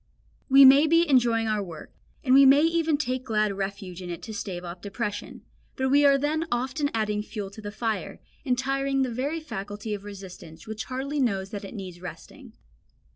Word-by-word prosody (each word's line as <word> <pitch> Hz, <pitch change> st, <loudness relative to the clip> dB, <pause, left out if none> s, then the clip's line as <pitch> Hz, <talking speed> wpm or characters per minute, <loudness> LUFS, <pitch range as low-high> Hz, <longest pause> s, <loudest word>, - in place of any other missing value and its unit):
We 270 Hz, +1 st, +9 dB
may 275 Hz, +4 st, +8 dB
be 335 Hz, +2 st, +4 dB
enjoying 240 Hz, -5 st, +3 dB
our 215 Hz, -1 st, 0 dB
work, 170 Hz, -5 st, -9 dB, 0.3 s
and 255 Hz, -3 st, +3 dB
we 275 Hz, +1 st, +8 dB
may 275 Hz, +2 st, +7 dB
even 325 Hz, -2 st, +2 dB
take 255 Hz, -3 st, -2 dB
glad 215 Hz, -4 st, 0 dB
refuge 195 Hz, -2 st, -5 dB
in 180 Hz, -, -7 dB
it 170 Hz, -, -6 dB
to 220 Hz, -, -7 dB
stave 185 Hz, -4 st, -5 dB
off 175 Hz, +1 st, -8 dB
depression, 205 Hz, +1 st, -5 dB, 0.3 s
but 265 Hz, 0 st, 0 dB
we 285 Hz, +1 st, +5 dB
are 280 Hz, -1 st, +6 dB
then 310 Hz, +4 st, -1 dB
often 265 Hz, +5 st, -1 dB
adding 210 Hz, -2 st, -1 dB
fuel 210 Hz, -2 st, -6 dB
to 215 Hz, -, -11 dB
the 205 Hz, -1 st, -6 dB
fire, 220 Hz, 0 st, -3 dB, 0.2 s
and 250 Hz, -3 st, 0 dB
tiring 270 Hz, +1 st, 0 dB
the 250 Hz, -3 st, -2 dB
very 285 Hz, +7 st, -2 dB
faculty 210 Hz, -7 st, -6 dB
of 200 Hz, -1 st, -5 dB
resistance, 190 Hz, -5 st, -11 dB
which 220 Hz, -1 st, -6 dB
hardly 270 Hz, +3 st, -3 dB
knows 195 Hz, -6 st, 0 dB
that 205 Hz, -2 st, -6 dB
it 195 Hz, -, -9 dB
needs 185 Hz, -4 st, -8 dB
resting. 165 Hz, -3 st, -10 dB
230 Hz, 195 wpm, -26 LUFS, 200-275 Hz, 0.3 s, We